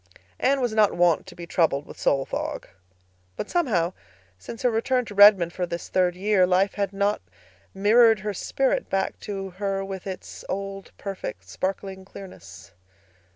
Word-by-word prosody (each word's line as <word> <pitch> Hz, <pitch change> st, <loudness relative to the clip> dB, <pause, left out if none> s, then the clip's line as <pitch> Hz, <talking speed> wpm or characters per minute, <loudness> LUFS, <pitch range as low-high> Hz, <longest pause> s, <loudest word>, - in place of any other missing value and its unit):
Anne 275 Hz, +1 st, +2 dB
was 245 Hz, -4 st, 0 dB
not 215 Hz, -2 st, +3 dB
wont 175 Hz, -2 st, +2 dB
to -, -, -11 dB
be 170 Hz, -, -8 dB
troubled 155 Hz, -4 st, +1 dB
with -, -, -11 dB
soul 135 Hz, -1 st, +1 dB
fog. -, -, -4 dB, 0.7 s
But, -, -, -5 dB
somehow, 200 Hz, -, +1 dB, 0.5 s
since 225 Hz, -, -9 dB
her 250 Hz, -, +3 dB
return 250 Hz, +3 st, +1 dB
to 210 Hz, -, -9 dB
Redmond 200 Hz, -4 st, +7 dB
for 180 Hz, -1 st, -2 dB
this 170 Hz, 0 st, -6 dB
third 180 Hz, -1 st, +2 dB
year, 190 Hz, -1 st, +3 dB
life 190 Hz, +2 st, +2 dB
had 200 Hz, -2 st, -2 dB
not 200 Hz, +1 st, 0 dB, 0.5 s
mirrored 220 Hz, +2 st, +5 dB
her 210 Hz, 0 st, -3 dB
spirit 265 Hz, +7 st, -1 dB
back 195 Hz, 0 st, -1 dB
to 195 Hz, -2 st, -5 dB
her 195 Hz, +1 st, -2 dB
with 195 Hz, -1 st, -7 dB
its 190 Hz, -1 st, -7 dB
old, 195 Hz, 0 st, -5 dB
perfect, 105 Hz, -, -6 dB
sparkling 190 Hz, -, -4 dB
clearness. 185 Hz, -, -12 dB
195 Hz, 160 wpm, -25 LUFS, 180-210 Hz, 0.7 s, Redmond